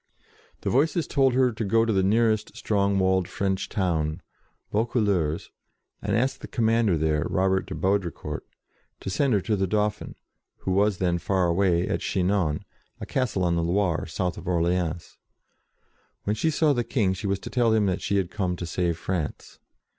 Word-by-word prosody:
The - - -1
Voices 160 +6 +2
told 135 -3 +2
her 130 -1 +4
to 110 0 -4
go 115 +3 +3
to 115 - +1
the 95 - +3
nearest 110 +2 +1
strong 100 -2 +1
walled 95 -1 +2
French 95 -1 -2
town, 80 -6 -1 0.5
Vaucouleurs, 100 -8 0 0.5
and - - 0
ask 130 +4 0
the - - -8
commander 115 -5 +2
there, 75 -1 0
Robert 95 0 +1
de 95 - -5
Baudricourt, 90 -5 -1 0.6
to - - -5
send 135 +5 +2
her 100 - +3
to 110 +2 0
the 95 -1 0
Dauphin, 105 +1 -1 0.5
who 95 - -2
was 100 +1 +2
then 85 -1 0
far 95 +2 +1
away, 85 0 +2
at - - -1
Chinon, 90 -2 0 0.3
a - - -5
castle 120 -8 -1
on 85 -1 +2
the 85 - +1
Loire, 85 0 0
south 90 -2 -2
of - - -11
Orleans. 85 -1 -1 1.0
When 105 - 0
she 160 +9 +1
saw 155 -1 +3
the 120 -2 0
King, 105 -7 +1
she 100 +2 -4
was 100 0 +1
to - - -9
tell 120 -2 +2
him 110 -2 +3
that 95 -1 0
she 100 - 0
had 95 -3 -1
come 95 -4 -1
to 90 - -5
save 85 0 -1
France. 85 -4 -4
95 Hz, 180 wpm, -26 LUFS, 90-110 Hz, 1.0 s, her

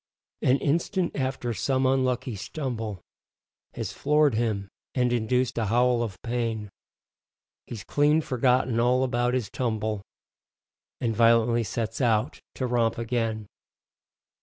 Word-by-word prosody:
An 130 +2 +4
instant 170 +5 0
after 130 -3 -2
some 130 +3 0
unlucky 130 -2 +1
stumble 110 - -5 0.7
Has - - -4
floored 150 -1 +3
him 110 -3 -1 0.3
and 125 -2 +2
induced 125 +2 0
a 110 - 0
howl 120 +2 +3
of 100 -5 -4
pain, 115 -4 -2 1.0
He's 110 -5 -7
clean 150 +2 +3
forgotten 125 -3 +1
all 125 +2 +3
about 120 -1 +1
his 125 -5 -2
tumble 110 -4 -2 1.0
And 115 -2 -1
violently 115 +1 +4
sets 115 +1 -3
out 110 -4 +1
to 130 - -2
romp 120 -2 +1
again. 115 -2 -2
120 Hz, 120 wpm, -26 LUFS, 115-130 Hz, 1.0 s, An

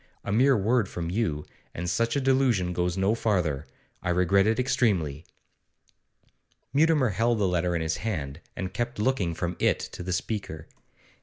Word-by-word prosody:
A - - -3
mere 130 +5 +4
word 110 +1 +1
from 85 -1 -4
you, 90 -8 -1 0.3
and 90 +1 -3
such 115 +6 0
a - - +2
delusion 130 -9 +2
goes 90 +1 -1
no 95 +3 +2
farther. 90 -11 0 0.3
I - - -3
regret 90 +3 +3
it 110 0 +2
extremely.' 90 - +1 1.5
Mutimer 150 -3 +4
held 115 +4 +1
the 100 -2 +2
letter 90 -1 0
in 80 - -1
his 80 0 -1
hand, 80 -8 -4
and 95 -1 -4
kept 120 +2 -3
looking 105 -7 0
from 90 +1 -3
it - - +3
to - - -7
the 90 +1 -4
speaker. 95 -5 -3
95 Hz, 165 wpm, -27 LUFS, 85-115 Hz, 1.5 s, mere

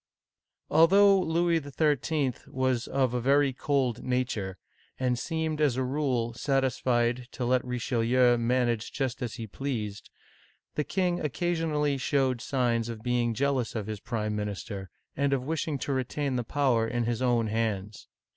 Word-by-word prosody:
ALTHOUGH 195 +4 +6
Louis 170 0 +2
XIII. 145 -1 0
was 130 -2 0
of 130 -3 +1
a 125 - 0
very 140 +2 +3
cold 130 -3 0
nature, 120 -7 -2 0.4
and 125 -2 +1
seemed 160 -1 -2
as 140 -5 +2
a 130 - +1
rule 130 -4 -1
satisfied 125 -2 0
to 125 - -3
let 125 0 +2
Richelieu 125 0 +2
manage 120 -2 0
just 135 -2 -2
as 120 -2 -3
he 115 -3 -5
pleased, 110 -4 -4 0.6
the 150 - 0
king 180 +1 0
occasionally 150 -3 0
showed 130 -2 +1
signs 120 -3 0
of 110 -2 -7
being 120 -2 +1
jealous 135 -2 0
of 110 -3 -2
his 110 -1 -5
prime 110 -2 -3
minister, 100 -2 -5 0.3
and 140 0 +1
of 130 -2 0
wishing 155 0 -2
to 140 +2 -2
retain 135 +1 -1
the 120 - 0
power 120 -3 +1
in 120 0 -1
his 115 +1 -1
own 120 -3 +2
hands. 105 -2 -2
125 Hz, 150 wpm, -28 LUFS, 115-140 Hz, 0.6 s, ALTHOUGH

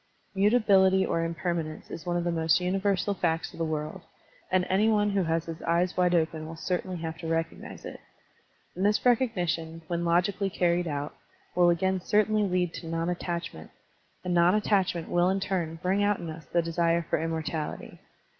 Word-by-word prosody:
Mutability 195 -2 +4
or 165 - 0
impermanence 165 -1 -3
is 165 +1 -7
one 175 0 0
of 175 - -1
the 175 - 0
most 165 0 +2
universal 195 +2 0
facts 165 -3 -1
of - - -12
the - - +1
world, 155 +3 -4 0.5
and 185 -1 +3
any 205 +4 +3
one 210 -1 +2
who 200 -1 +1
has 165 0 0
his 165 0 -7
eyes 175 +2 +1
wide 180 -1 +3
open 160 -1 0
will 165 - -7
certainly 180 +2 -3
have 160 -1 -5
to 165 - -6
recognize 165 0 -3
it. - - -8 0.8
And 185 - -2
this 210 +4 +2
recognition, 175 - +1
when 170 +1 -2
logically 180 +4 +1
carried 175 -1 +1
out, 145 -1 -3 0.4
will 175 -1 +4
again 185 +2 +1
certainly 215 +2 +2
lead 180 -3 0
to 165 - -7
non 165 +1 -1
attachment; 170 - -5 0.5
and 180 -1 -1
non 175 +2 +5
attachment 190 -5 +1
will 175 +1 +2
in 195 +1 +1
turn 180 -4 -2
bring 195 +3 +2
out 205 0 +2
in 165 - -6
us 155 0 -10
the 170 -1 0
desire 170 0 +1
for - - 0
immortality. 160 -1 -4
175 Hz, 185 wpm, -28 LUFS, 165-190 Hz, 0.8 s, non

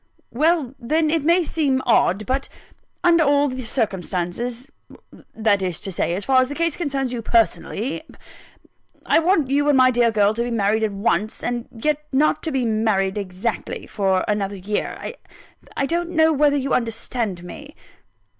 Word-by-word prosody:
"Well, 300 -1 +1
then, 305 +5 +1
it 325 -3 +1
may 340 +3 +4
seem 280 -5 0
odd; 215 -4 +2
but 265 +4 -2 0.5
under 340 -2 +5
all 285 0 +3
the 260 -1 -4
circumstances 225 +2 -2 0.6
that 215 -3 +2
is 180 -3 -3
to 195 - -5
say, 175 -1 -1
as 195 - -4
far 260 -1 +4
as 255 - -1
the 290 - -5
case 335 -1 0
concerns 275 -6 -2
you 240 - -3
personally 230 +2 0 1.0
I - - +4
want 325 -5 +1
you 290 +1 +2
and 285 - +4
my 255 0 +6
dear 240 -1 +3
girl 210 -1 +2
to 235 - -3
be 240 - -1
married 220 -1 +1
at 220 -1 0
once, 205 +1 -1
and 240 -1 -3
yet 300 +6 -1
not 290 +3 +2
to 320 - -3
be 265 -3 0
married 215 -3 +1
exactly, 195 +3 -4
for 190 -2 0
another 205 -1 -1
year. 205 +3 -3 0.8
I 275 - +1
don't 340 +3 -1
know 320 -2 +3
whether 290 0 +3
you 275 0 -1
understand 225 -5 -2
me?" 290 - -10
245 Hz, 170 wpm, -21 LUFS, 210-290 Hz, 1.0 s, my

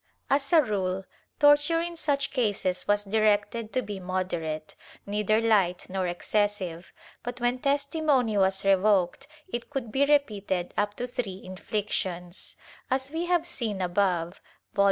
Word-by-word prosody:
As 275 0 +2
a 325 -3 +7
rule 190 -4 -2 0.3
torture 290 +3 +5
in 340 +1 -3
such 285 -4 0
cases 205 -8 0
was 205 0 +2
directed 215 +1 +1
to 255 - +1
be 205 -2 -6
moderate, 175 -4 -3 0.3
neither 210 +1 +1
hght 200 -7 +2
nor 190 -1 -1
excessive, 185 -1 -1 0.3
but 245 0 -6
when 245 +1 +1
testimony 280 -4 +1
was 190 0 +2
revoked 195 +5 +3 0.2
it 240 -10 -5
could 265 -6 -4
be 270 +5 +2
repeated 205 -11 +1
up 205 0 0
to 245 - -3
three 220 -6 -4
inflictions,^ 185 -2 -4 0.3
As 265 +1 -1
we 330 +2 -2
have 350 -2 +2
seen 230 - -3
above 180 -2 0 0.3
(Vol. - - -6
210 Hz, 140 wpm, -27 LUFS, 190-270 Hz, 0.3 s, a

